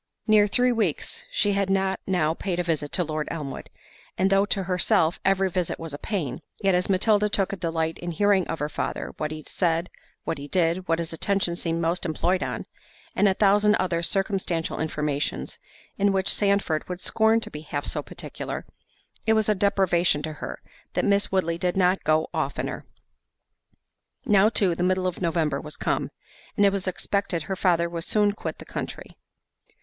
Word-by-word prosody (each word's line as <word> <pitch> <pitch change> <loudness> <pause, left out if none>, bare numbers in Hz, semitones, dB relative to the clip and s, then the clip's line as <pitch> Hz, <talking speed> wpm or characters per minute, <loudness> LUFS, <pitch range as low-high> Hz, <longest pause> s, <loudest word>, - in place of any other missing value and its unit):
Near 215 -2 +5
three 250 +5 +2
weeks 225 - -1
she 205 - +2
had 200 -1 0
not 190 0 +1
now 170 -5 +2
paid 180 +1 -3
a - - +1
visit 155 -4 -1
to 180 - +2
Lord 155 -1 -3
Elmwood, 150 -5 -5 0.5
and 190 +1 +2
though 195 +1 +4
to 195 -2 0
herself 175 -2 +2
every 195 0 +3
visit 180 -2 -2
was 165 -3 -7
a 145 - -6
pain, 155 - -3 0.2
yet 195 -1 +2
as 180 +2 +1
Matilda 210 +2 +3
took 200 -2 0
a - - -1
delight 165 -2 -2
in 175 - -4
hearing 195 +2 +2
of 165 - -3
her 150 - -1
father, - - -4
what 155 - -2
he 155 0 -7
said, 170 -1 0 0.3
what - - -3
he 140 - -7
did, 175 +2 +1
what 165 - +2
his 165 0 -4
attention 190 0 0
seemed 165 -1 -2
most 170 +2 0
employed 175 +3 0
on, - - -3 0.5
and 205 - +4
a 190 - +3
thousand 210 +1 +4
other 180 -3 0
circumstantial 190 -3 -1
informations, 150 -2 -2 0.4
in 200 0 +4
which 190 0 +2
Sandford 200 -7 +1
would 180 -1 -4
scorn 220 +3 +3
to - - -6
be 150 - -7
half 145 -2 -4
so - - -2
particular, - - -6 0.6
it 220 - +5
was 220 -1 +2
a - - +5
deprivation 185 -6 +2
to 155 - -4
her, - - -7 0.3
that - - 0
Miss 200 0 +2
Woodley 170 -3 0
did 180 +1 0
not 185 0 +3
go 155 +1 +2
oftener. - - -3 1.4
Now 210 -3 +5
too, 195 -5 +2
the 170 - -4
middle 185 +1 +1
of 185 -1 -2
November 160 -5 0
was 150 0 -8
come, - - -1 0.5
and 205 - +5
it 200 - +5
was 195 -1 -2
expected 185 -2 -1
her 190 - -3
father 170 -2 +2
would 170 -1 -5
soon 210 +2 +2
quit 205 - -5
the - - -11
country. - - -6
180 Hz, 190 wpm, -25 LUFS, 165-200 Hz, 1.4 s, Near